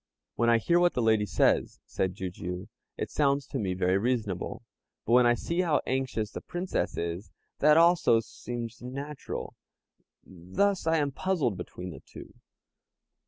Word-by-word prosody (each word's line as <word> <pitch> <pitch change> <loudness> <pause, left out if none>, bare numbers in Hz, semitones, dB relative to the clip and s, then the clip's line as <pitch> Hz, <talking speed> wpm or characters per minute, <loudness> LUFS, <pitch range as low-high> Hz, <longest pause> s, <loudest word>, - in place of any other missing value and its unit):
"When 115 +1 +2
I 115 - +6
hear 170 +10 +2
what 175 0 +3
the 125 - +1
lady 110 -2 +3
says," - - +2
said 95 -1 -2
Jijiu, 90 +1 -5 0.3
"it - - -4
sounds 140 -2 +2
to 135 - -4
me 95 -4 -1
very 95 +1 +2
reasonable; 110 -5 -2 0.4
but 115 - +1
when 125 0 +6
I 120 - +4
see 170 +8 -1
how 165 -4 +2
anxious 130 -5 -1
the - - -6
Princess 175 +1 -3
is, 85 +4 -3 0.3
that 150 +1 +6
also 165 -8 +5
seems 115 +1 -7
natural. 140 +4 -6 0.7
Thus 95 - -1
I 165 0 +3
am 145 -2 0
puzzled 145 - 0
between 90 0 -7
the - - -9
two. - - -12
120 Hz, 160 wpm, -28 LUFS, 100-150 Hz, 0.7 s, I